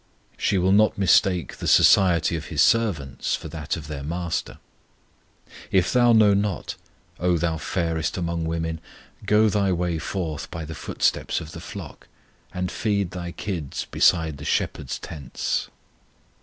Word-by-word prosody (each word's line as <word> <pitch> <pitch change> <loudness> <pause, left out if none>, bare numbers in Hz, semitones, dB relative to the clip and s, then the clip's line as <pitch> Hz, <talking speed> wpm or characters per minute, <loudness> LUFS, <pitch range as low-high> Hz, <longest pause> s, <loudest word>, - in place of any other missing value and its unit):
She 100 - 0
will 95 +1 +2
not 105 +2 +4
mistake 95 -2 +2
the - - -5
society 85 -4 +5
of 80 -1 -5
His 75 -3 +2
servants 95 -13 +1
for 80 - -8
that 75 0 -4
of 80 - -8
their 75 -2 -6
MASTER. 85 +3 -3 1.1
If 95 -3 +2
thou 120 -1 +5
know 110 -3 +6
not, 100 -2 -1 0.5
O 90 0 +2
thou 80 -1 -1
fairest 80 -2 -2
among 85 -2 -2
women, 80 0 -3 0.5
Go 105 +1 +5
thy 100 -2 +1
way 85 -2 -1
forth 80 -3 -4
by 85 -1 -6
the 80 - -7
footsteps - - -1
of 80 -1 -9
the - - -9
flock, - - -9 0.4
And 90 0 -3
feed 100 -4 -1
thy 85 -1 -5
kids 85 -8 -4
beside 80 -5 +2
the - - -8
shepherds' 65 -4 -1
tents. 70 -4 -4
85 Hz, 150 wpm, -24 LUFS, 80-95 Hz, 1.1 s, know